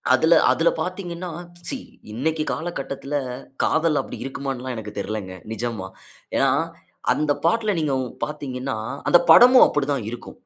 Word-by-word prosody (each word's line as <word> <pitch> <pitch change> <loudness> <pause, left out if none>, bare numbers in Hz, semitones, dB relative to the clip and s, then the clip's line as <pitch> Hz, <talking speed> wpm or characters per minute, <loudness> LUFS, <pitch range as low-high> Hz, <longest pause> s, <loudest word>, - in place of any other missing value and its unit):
அதில - - +5
அதில - - +3
பார்த்தீங்கன்னா, 180 -2 -4 0.4
சீ! 270 - -3 0.4
இன்னைக்கி 155 +5 -1
காலகட்டத்துல, 145 -4 -4 0.5
காதல் 160 -2 +2
அப்பிடி - - -9
இருக்குமான்லான் 135 -2 -4
எனக்கு 105 -1 -8
தெரியலங்க. 100 -3 -4 0.2
நிஜமா. 110 -4 -4 0.5
ஏனா, - - +4 0.6
அந்த 150 -1 0 0.2
பாட்ல, 215 +2 +2
நீங்க 140 -3 0
உங் 125 - -5 0.2
பார்த்தீங்கனா, 135 -4 -4 0.3
அந்த 175 - +7
படமும் 250 +1 +9
அப்பிடி 145 -1 -1
தான் 115 -6 -3
இருக்கும். 120 - -9
140 Hz, 130 wpm, -23 LUFS, 120-170 Hz, 0.6 s, படமும்